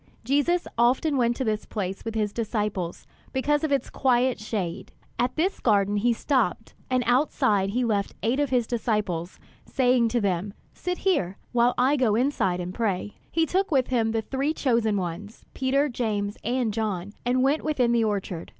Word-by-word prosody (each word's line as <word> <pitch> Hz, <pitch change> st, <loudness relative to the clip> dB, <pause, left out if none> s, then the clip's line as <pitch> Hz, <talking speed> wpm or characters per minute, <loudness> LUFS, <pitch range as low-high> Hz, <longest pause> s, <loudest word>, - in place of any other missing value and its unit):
Jesus 290 Hz, +8 st, +1 dB
often 255 Hz, +5 st, +3 dB
went 240 Hz, -2 st, +2 dB
to 260 Hz, -, -2 dB
this 215 Hz, -3 st, -2 dB
place 195 Hz, -3 st, -4 dB
with 225 Hz, -1 st, -5 dB
his 210 Hz, -2 st, 0 dB
disciples, 210 Hz, -6 st, -2 dB, 0.3 s
because 295 Hz, +3 st, +1 dB
of 310 Hz, -, 0 dB
its 275 Hz, -, 0 dB
quiet 255 Hz, -2 st, +2 dB
shade. 200 Hz, -4 st, -4 dB, 0.3 s
At 245 Hz, +1 st, 0 dB
this 360 Hz, +5 st, 0 dB
garden 200 Hz, 0 st, +2 dB
he 240 Hz, +4 st, +2 dB
stopped, 230 Hz, -4 st, 0 dB, 0.2 s
and 255 Hz, -1 st, +2 dB
outside 230 Hz, -6 st, +2 dB
he 245 Hz, +4 st, 0 dB
left 205 Hz, -3 st, -1 dB
eight 240 Hz, +5 st, +1 dB
of 290 Hz, -2 st, +1 dB
his 250 Hz, -2 st, +2 dB
disciples, 210 Hz, -7 st, -2 dB, 0.3 s
saying 250 Hz, -2 st, +2 dB
to 240 Hz, +2 st, 0 dB
them, 195 Hz, -1 st, -1 dB, 0.2 s
"Sit 360 Hz, 0 st, -3 dB
here 195 Hz, -, 0 dB
while 240 Hz, 0 st, +3 dB
I 265 Hz, +4 st, +3 dB
go 235 Hz, -6 st, +2 dB
inside 220 Hz, -8 st, +1 dB
and 180 Hz, +1 st, -4 dB
pray." 205 Hz, -3 st, -2 dB, 0.2 s
He 325 Hz, -1 st, +2 dB
took 385 Hz, +5 st, 0 dB
with 265 Hz, -5 st, +2 dB
him 235 Hz, -3 st, +1 dB
the 225 Hz, 0 st, -1 dB
three 275 Hz, +6 st, -1 dB
chosen 230 Hz, -5 st, +1 dB
ones, 185 Hz, +4 st, -5 dB
Peter, 275 Hz, +2 st, +1 dB
James, 210 Hz, -5 st, -2 dB
and 240 Hz, -1 st, 0 dB
John, 205 Hz, -3 st, -3 dB
and 255 Hz, +1 st, +2 dB
went 280 Hz, +4 st, +2 dB
within 260 Hz, -6 st, +1 dB
the 235 Hz, -1 st, +3 dB
orchard. 195 Hz, -5 st, -2 dB
235 Hz, 175 wpm, -26 LUFS, 205-260 Hz, 0.3 s, often